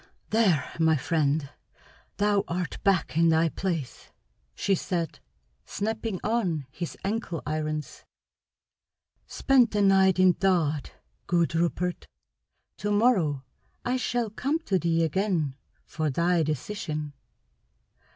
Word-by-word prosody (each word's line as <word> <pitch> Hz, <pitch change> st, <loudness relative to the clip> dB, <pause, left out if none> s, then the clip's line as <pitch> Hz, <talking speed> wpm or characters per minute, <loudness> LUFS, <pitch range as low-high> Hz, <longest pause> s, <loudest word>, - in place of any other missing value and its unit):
"There, 195 Hz, -, +3 dB
my 160 Hz, -1 st, +4 dB
friend, 145 Hz, 0 st, 0 dB, 0.7 s
thou 205 Hz, -1 st, +2 dB
art 180 Hz, 0 st, -3 dB
back 190 Hz, -6 st, +2 dB
in 165 Hz, +1 st, +4 dB
thy 160 Hz, +1 st, +3 dB
place!" 165 Hz, -5 st, -4 dB, 0.5 s
she 200 Hz, -, +1 dB
said, 175 Hz, -2 st, -2 dB, 0.4 s
snapping 220 Hz, -2 st, -3 dB
on 190 Hz, -, 0 dB
his 170 Hz, +3 st, -6 dB
ankle 200 Hz, -5 st, -3 dB
irons. 155 Hz, 0 st, -3 dB, 1.2 s
"Spend 260 Hz, -4 st, +3 dB
the 210 Hz, -1 st, +1 dB
night 190 Hz, -1 st, +5 dB
in 185 Hz, -1 st, +5 dB
thought, 165 Hz, -6 st, 0 dB, 0.3 s
good 170 Hz, -1 st, +2 dB
Rupert. 170 Hz, +1 st, -1 dB, 0.7 s
To 205 Hz, -, -2 dB
morrow 195 Hz, -, +2 dB, 0.4 s
I 245 Hz, -, +1 dB
shall 240 Hz, -3 st, -1 dB
come 275 Hz, +8 st, -1 dB
to 195 Hz, -, 0 dB
thee 165 Hz, -1 st, +1 dB
again 165 Hz, -3 st, 0 dB, 0.3 s
for 155 Hz, 0 st, -2 dB
thy 170 Hz, +4 st, +2 dB
decision. 155 Hz, -1 st, -3 dB
175 Hz, 110 wpm, -27 LUFS, 155-205 Hz, 1.2 s, night